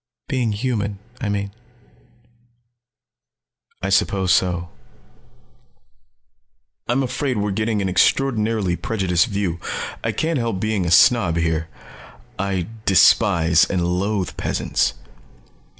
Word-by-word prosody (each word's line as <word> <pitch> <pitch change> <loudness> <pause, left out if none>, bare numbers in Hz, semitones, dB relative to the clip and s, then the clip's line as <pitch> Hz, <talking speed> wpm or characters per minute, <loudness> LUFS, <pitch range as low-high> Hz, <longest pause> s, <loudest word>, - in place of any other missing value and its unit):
"Being 120 -5 -1
human, 105 -3 -2 0.2
I 110 - -2
mean." 100 -1 -2 2.3
"I 100 - -1
suppose 95 -2 +2
so. 85 -1 0 2.2
I'm 125 +3 +1
afraid 130 0 -2
we're 105 0 -1
getting 110 0 -1
an - - -1
extraordinarily 110 -2 +1
prejudiced 95 -1 0
view. 100 -6 -2 0.4
I - - 0
can't 160 -3 -1
help 115 -5 -2
being 105 -3 -1
a - - 0
snob 105 -2 +5
here. 80 -1 -1 0.7
I 95 -3 -1 0.2
despise 90 -3 +4
and 90 -3 0
loathe 95 +1 -1
peasants." - - -1
100 Hz, 105 wpm, -21 LUFS, 90-115 Hz, 2.3 s, snob